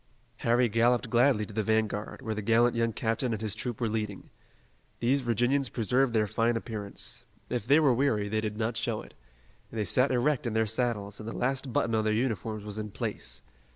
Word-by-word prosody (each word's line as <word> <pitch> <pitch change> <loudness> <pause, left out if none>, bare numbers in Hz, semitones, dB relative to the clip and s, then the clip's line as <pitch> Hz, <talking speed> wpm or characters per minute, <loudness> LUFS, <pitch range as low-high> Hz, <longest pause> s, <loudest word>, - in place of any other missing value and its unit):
Harry 120 +1 +3
galloped 115 +2 +2
gladly 120 -3 +4
to - - -11
the 110 - 0
vanguard, 110 -1 -1
where 110 - -2
the 105 - -3
gallant 115 +3 +3
young 115 0 +1
captain 115 +2 -1
and 110 - -4
his 105 -2 -1
troop 115 +1 -4
were 115 - 0
leading. 105 -2 -4 0.7
These 130 +4 +2
Virginians 120 +3 +1
preserved 125 +2 +1
their 110 -2 +3
fine 115 +3 +1
appearance. 105 -3 -4 0.3
If 120 -3 -2
they 145 +4 +6
were 145 -5 +4
weary 115 -5 +1
they 110 +1 0
did 105 -1 -3
not 115 +1 -1
show 115 -1 -2
it. - - -15 0.6
They 110 -2 -2
sat 130 +5 +3
erect 130 +1 +1
in 115 - -2
their 110 0 +2
saddles 105 -2 -1
and 110 +1 -6
the - - -6
last 130 +1 -1
button 115 - +1
on 110 -1 +2
their 110 0 +1
uniforms 110 -2 -1
was 105 0 -5
in 105 0 -4
place. - - -5
115 Hz, 205 wpm, -29 LUFS, 110-120 Hz, 0.7 s, they